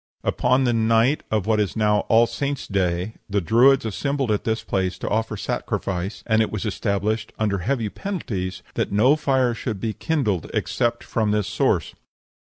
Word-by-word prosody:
Upon 130 +1 +2
the 120 -2 +2
night 115 +5 +3
of 105 -3 0
what 110 -1 +2
is 105 -2 0
now 105 -1 +3
All 115 +1 +6
Saints 140 +3 -3
day 95 +1 -1
the 100 0 +1
Druids 120 +8 +4
assembled 135 +3 -1
at 105 - -1
this 110 0 -1
place 95 -1 -1
to - - -5
offer 110 0 -1
sacrifice, 95 0 -3
and 110 -1 +3
it 110 - 0
was 110 +1 -3
established, 105 +1 -1
under 105 -3 0
heavy 115 +4 -1
penalties, 100 - -4
that - - -1
no 115 +8 +4
fire 130 -5 +1
should 110 -3 -4
be 110 +2 -2
kindled 115 - -1
except 120 0 0
from 110 -2 -1
this 105 -1 +1
source. - - 0
110 Hz, 175 wpm, -23 LUFS, 100-120 Hz, -, All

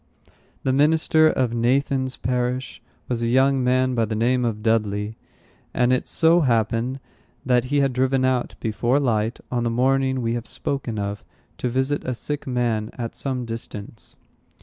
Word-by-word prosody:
The 130 - +1
minister 155 +2 +4
of 130 -6 +1
Nathan's 130 +2 +1
parish 125 +1 -2 0.3
was 120 -2 -2
a 115 - 0
young 130 +2 +3
man 130 +1 +2
by 115 -2 +1
the 110 0 -3
name 125 +3 +2
of 105 -2 -2
Dudley; 105 -1 0 0.6
and 125 +1 +3
it 130 - 0
so 165 +1 +4
happened 120 0 +1 0.5
that 125 -1 +3
he 145 +2 +1
had 135 -2 +1
driven 130 +1 +2
out, 130 -2 0
before 120 +5 +1
light, 115 -4 0
on 120 -1 0
the 120 - +1
morning 130 +2 +1
we 115 0 0
have 120 0 -4
spoken 135 -5 -3
of, 100 0 -3 0.4
to 125 - -1
visit 130 +4 0
a 125 - -2
sick 145 +4 -5
man 120 -4 0
at 115 -2 -5
some 130 -3 -3
distance. 115 -2 -8
125 Hz, 165 wpm, -23 LUFS, 115-130 Hz, 0.6 s, minister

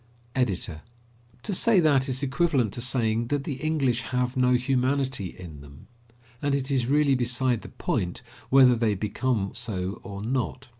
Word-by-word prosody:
EDITOR: 95 -10 -1 0.6
To 205 - -3
say 215 +2 +3
that 140 -5 +3
is 130 +2 -2
equivalent 140 - +1
to 120 - -4
saying 115 -2 0
that 145 +1 -1
the 140 -3 -4
English 135 -7 +1
have 125 +2 -2
no 125 -1 +3
humanity 130 -2 +1
in 80 -6 -10
them. 70 0 -14 0.6
And 145 -1 +1
it 135 0 -2
is 130 -3 +1
really 145 0 +3
beside 125 -1 +1
the - - -10
point 90 +6 -3 0.3
whether 130 -2 +6
they 110 -3 +1
become 105 +1 -1
so 100 -5 -4
or 100 0 -7
not. 130 +2 -3
125 Hz, 160 wpm, -26 LUFS, 110-135 Hz, 0.6 s, whether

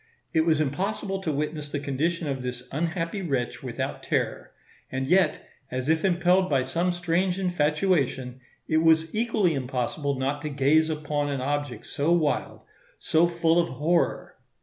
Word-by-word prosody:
It 160 0 +2
was 155 -2 +3
impossible 190 +6 -2
to 160 - -1
witness 150 0 -3
the 145 - -2
condition 155 +5 -1
of 135 -2 -2
this 125 0 -5
unhappy 165 +5 -2
wretch 135 -9 -2
without - - -4
terror; - - -2 0.4
and 130 0 -2
yet, 180 +1 +2 0.2
as 130 +3 -3
if 160 0 +2
impelled 185 0 +3
by 135 -3 +2
some 170 +8 0
strange 180 +1 0
infatuation, 150 -7 0 0.3
it 155 - +2
was 160 0 +3
equally 215 -6 +1
impossible 135 +2 -2
not 140 +2 -1
to 150 - -3
gaze 145 +3 +3
upon 150 -2 -1
an 140 -2 -2
object 140 -3 -3
so 145 +4 -1
wild, 160 -4 0 0.4
so 165 +1 +3
full 170 0 +2
of 170 - -3
horror. 165 +6 0
155 Hz, 155 wpm, -26 LUFS, 140-175 Hz, 0.4 s, was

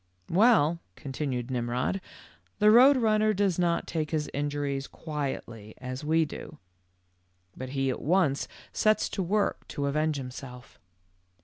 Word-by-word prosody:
"Well," 170 -5 +4 0.2
continued 135 -3 -4
Mmrod, 125 +9 -1 0.6
''the 210 0 +6
Koad 260 +4 +7
Run 215 -2 +3
ner 215 0 +3
does 195 -3 +1
not 170 -1 +1
take 155 -2 -2
his 155 -2 -2
injuries 145 -1 -2
quietly 135 -8 -5
as 130 +2 -6
we 160 +2 +2
do, - - -9 1.0
but 130 0 -6
he 135 -1 +1
at - - -5
once 155 -3 +2 0.3
sets 215 -1 +2
to 195 - -3
work 200 +3 0
to 140 - -3
avenge 155 +1 0
him 125 -1 -6
self. 125 -2 -11
150 Hz, 140 wpm, -28 LUFS, 135-190 Hz, 1.0 s, Koad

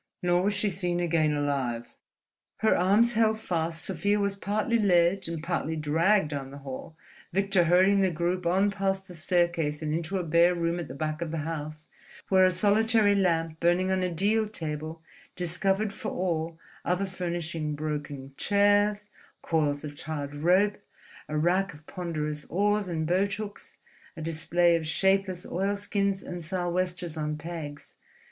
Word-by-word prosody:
Nor 175 0 +3
was 205 +2 +1
she 205 0 +1
seen 175 -1 -1
again 165 -3 +2
alive. 135 -5 -2 0.7
Her 220 - +4
arms 210 +6 +4
held 220 -1 +2
fast, 165 -5 -2
Sofia 200 +3 0
was 200 -1 0
partly 215 +4 0
led 180 -2 +3
and 165 -2 -5
partly 170 -2 -1
dragged 160 +4 +2
down 140 -3 -4
the 140 - -10
hall, 140 +3 -8 0.4
Victor 195 -1 +2
herding 190 +4 +4
the 190 - +3
group 175 +2 -1
on 195 +4 +3
past 195 -1 -1
the 180 - -10
staircase 165 -2 0
and 150 0 -1
into 170 +4 -2
a 185 - -1
bare 170 +2 +4
room 170 0 -1
at 170 - -5
the 130 - -8
back 155 +2 -3
of 170 - -2
the 155 -1 -3
house, 155 -1 -5 0.4
where 190 -1 +5
a - - +5
solitary 210 +3 +3
lamp 165 -5 +1
burning 175 +2 +2
on 190 0 +1
a 180 - 0
deal 210 +6 +1
table 160 -4 -5 0.3
discovered 195 +4 0
for - - -5
all 165 -2 -2 0.3
other 180 +3 0
furnishing 170 -4 -3
broken 145 -3 -5
chairs, 205 0 +3 0.4
coils 150 -3 0
of 150 -1 -6
tarred 145 -1 -5
rope, 185 +7 +2 0.5
a 150 - -1
rack 180 +3 +1
of 150 +1 -17
ponderous 155 -4 -4
oars 205 +2 +1
and 160 -3 -2
boat 190 +4 +1
hooks, 210 -1 -8 0.4
a - - -6
display 170 +2 +2
of 160 -2 -2
shapeless 190 +1 +1
oilskins 200 +1 -1
and 175 -1 -6
sou'westers 180 0 -2
on 150 0 -2
pegs. 155 -2 -7
175 Hz, 160 wpm, -28 LUFS, 155-195 Hz, 0.7 s, where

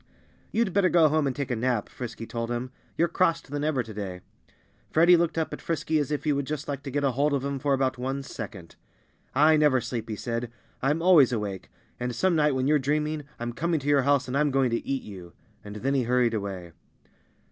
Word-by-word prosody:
"You'd 225 -5 0
better 195 -2 +3
go 165 -3 +5
home 155 -1 +1
and 130 - -2
take 140 -2 -3
a - - +1
nap," 120 -2 0
Frisky 120 -2 -7
told 115 0 -4
him. 120 +1 -3 0.3
"You're 170 - +3
crosser 165 -3 0
than 145 0 -2
ever 145 -5 +1
to 110 -1 -10
day." 95 -3 -6 0.7
Freddie 170 +3 +6
looked 170 -1 0
up 160 - -1
at - - -7
Frisky 160 -1 -1
as 145 - -1
if 150 -1 -2
he 150 - +2
would 140 -1 -2
just 150 -1 -4
like 140 -1 -4
to 140 - -6
get 145 +2 -1
hold 140 +2 +1
of 135 0 -2
him 140 -1 -2
for 140 +1 +1
about 130 -1 -1
one 135 +2 -3
second. 90 -10 -8 0.6
"I 155 +3 +5
never 150 -4 +4
sleep," 115 -1 -5
he 110 - -2
said. 115 +1 -4 0.3
"I'm 150 +5 +1
always 165 -8 +6
awake. 105 -5 -4 0.3
And 125 -1 -3
some 185 +6 +2
night 150 -3 +3
when 130 0 0
you're 150 +1 +3
dreaming, 150 +2 -1
I'm 120 0 -4
coming 165 +5 0
to 140 - -8
your 145 -1 +4
house 140 0 +2
and 125 - -3
I'm 150 +1 +3
going 135 -2 +2
to 115 - -1
eat 135 -1 -2
you." 90 -4 -10 0.3
And 105 0 -9
then 130 +6 -1
he 135 - +2
hurried 125 -1 +2
away. 95 -5 -4
135 Hz, 230 wpm, -26 LUFS, 120-150 Hz, 0.7 s, Freddie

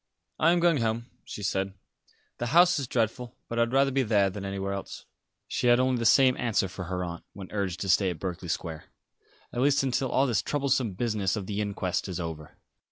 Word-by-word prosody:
"I 165 - +5
am 175 - +3
going 170 -2 +4
home," 115 0 -2
she 105 - -7
said. 95 0 -1 0.6
"The 120 - -2
house 175 +5 +5
is 135 - -3
dreadful; 120 +1 -1
but 115 - -3
I - - +5
would 115 0 +1
rather 135 +1 +3
be 135 +1 +2
there 105 -5 +2
than 100 +1 -7
anywhere 100 0 -3
else." 100 - -7 0.4
She - - -1
had 120 0 +6
only 130 -1 +2
the 115 - +2
same 130 +1 +5
answer 115 -5 +1
for 90 0 -7
her 90 +1 -3
aunt, 85 -1 -6
when 95 -2 -10
urged 100 -4 -2
to 95 - -3
stay 95 +1 +4
at 85 - -5
Berkeley 90 -1 -5
Square, 80 -2 -4 0.7
"at 120 - -1
least 140 0 +3
until 130 0 0
all 135 - +3
this 120 -6 +1
troublesome 135 -6 0
business 105 -2 -1
of 105 -3 -4
the 105 +1 -2
inquest 95 -3 -2
is 90 -2 -4
over." 80 -3 -6
105 Hz, 220 wpm, -28 LUFS, 95-125 Hz, 0.7 s, had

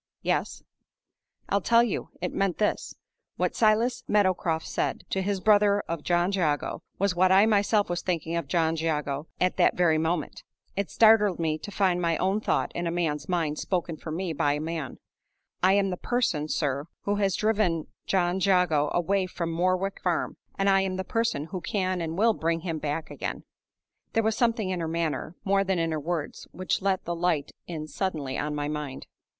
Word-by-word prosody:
"Yes." - - -1 0.8
"I'll 200 - +1
tell 235 +4 +5
you. 235 - -2
It 180 - -2
meant 195 -3 0
this: 210 - -1 0.4
What - - 0
Silas 225 +2 +2
Meadowcroft 185 -5 +1
said - - -2
to 190 - 0
his 195 0 -1
brother 205 0 +4
of 165 -2 -5
John 175 +3 +1
Jago 160 -7 0 0.2
was 200 -1 +1
what 185 +1 +4
I 195 +2 +7
myself 205 -1 +3
was 175 0 -2
thinking 165 -2 -2
of 170 - -2
John 165 -2 +1
Jago 150 -2 -2
at 180 0 +1
that - - +3
very 165 -3 +3
moment. 160 -1 -2 0.3
It 200 0 -2
startled 215 -4 +5
me 155 -2 -1
to 205 - -8
find 185 -3 +1
my 165 -2 +1
own 195 +3 +1
thought - - 0
in 175 0 -2
a - - -1
man's 165 -1 -2
mind 165 -4 0
spoken 175 -3 -2
for 155 - -9
me 170 +2 -2
by 145 -1 +1
a 150 - -2
man. 155 -4 -4 0.6
I 185 +1 +5
am 195 -1 +2
the 180 - -3
person, 175 -13 0
sir, 145 -2 -1 0.2
who 205 0 0
has 195 -2 +1
driven 205 -7 +1 0.2
John 180 -1 +1
Jago 180 -6 +3
away 185 +2 +1
from 170 -2 -4
Morwick 185 +3 0
Farm; 175 -3 -1 0.2
and 195 - +1
I 195 -1 +5
am 190 -1 -1
the 190 - -2
person 225 - -1
who 185 -3 -4
can 185 -2 -1
and 165 0 -3
will 225 +3 +4
bring 165 -3 -1
him 165 -2 -3
back 150 +2 -3
again." - - -5 0.7
There 225 - +2
was 220 0 +1
something 225 -5 +1
in 180 - -2
her 165 - -2
manner, 165 0 -2
more 195 0 +2
than 190 -1 0
in 165 -1 0
her 155 - -1
words, 160 0 -4
which 185 +1 -2
let 190 -1 0
the 170 - -2
light 170 -4 0 0.2
in 160 -3 -5
suddenly 155 -4 -3
on 150 0 -2
my 145 0 -2
mind. 150 -3 -5
180 Hz, 195 wpm, -27 LUFS, 160-195 Hz, 0.8 s, I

